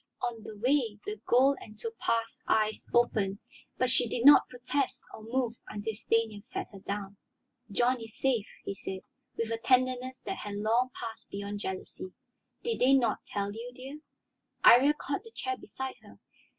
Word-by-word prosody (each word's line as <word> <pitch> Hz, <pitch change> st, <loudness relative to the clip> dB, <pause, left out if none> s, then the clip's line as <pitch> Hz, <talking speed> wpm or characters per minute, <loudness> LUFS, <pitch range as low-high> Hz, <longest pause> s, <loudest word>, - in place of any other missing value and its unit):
On 235 Hz, -2 st, -2 dB
the 215 Hz, -1 st, -9 dB
way 240 Hz, -2 st, +2 dB
the 210 Hz, 0 st, -5 dB
gold 265 Hz, +3 st, +5 dB
and 215 Hz, 0 st, -12 dB
topaz 230 Hz, 0 st, -2 dB
eyes 215 Hz, 0 st, +1 dB
opened, 210 Hz, -5 st, +2 dB, 0.4 s
but 255 Hz, -1 st, +2 dB
she 235 Hz, -, +3 dB
did 235 Hz, +2 st, -1 dB
not 290 Hz, -, +9 dB
protest 255 Hz, +2 st, -2 dB
or -, -, -9 dB
move 235 Hz, +1 st, -1 dB, 0.2 s
until 215 Hz, +1 st, -3 dB
Stanief 220 Hz, -1 st, 0 dB
set 250 Hz, +2 st, -5 dB
her 195 Hz, -, -10 dB
down. 200 Hz, 0 st, -5 dB, 0.5 s
"John 240 Hz, +4 st, +2 dB
is 225 Hz, -1 st, -9 dB
safe," 245 Hz, -6 st, +1 dB, 0.2 s
he -, -, -2 dB
said, 190 Hz, -1 st, -6 dB, 0.4 s
with 230 Hz, 0 st, -1 dB
a 225 Hz, -, -1 dB
tenderness 255 Hz, +1 st, +2 dB
that 385 Hz, -, -4 dB
had 205 Hz, -1 st, -5 dB
long 225 Hz, +5 st, +2 dB
passed 225 Hz, -1 st, -7 dB
beyond 200 Hz, +1 st, -4 dB
jealousy. 185 Hz, -1 st, -6 dB, 0.5 s
"Did 465 Hz, -1 st, -1 dB
they 265 Hz, +2 st, +6 dB
not 240 Hz, -5 st, +1 dB
tell 200 Hz, 0 st, -2 dB
you, 235 Hz, +3 st, -7 dB
dear?" 270 Hz, +4 st, -8 dB, 0.6 s
Iría 280 Hz, +5 st, +8 dB
caught 285 Hz, +5 st, -3 dB
the 455 Hz, -, -12 dB
chair 390 Hz, -3 st, -3 dB
beside 265 Hz, -8 st, -6 dB
her. -, -, -16 dB
230 Hz, 170 wpm, -30 LUFS, 210-255 Hz, 0.6 s, not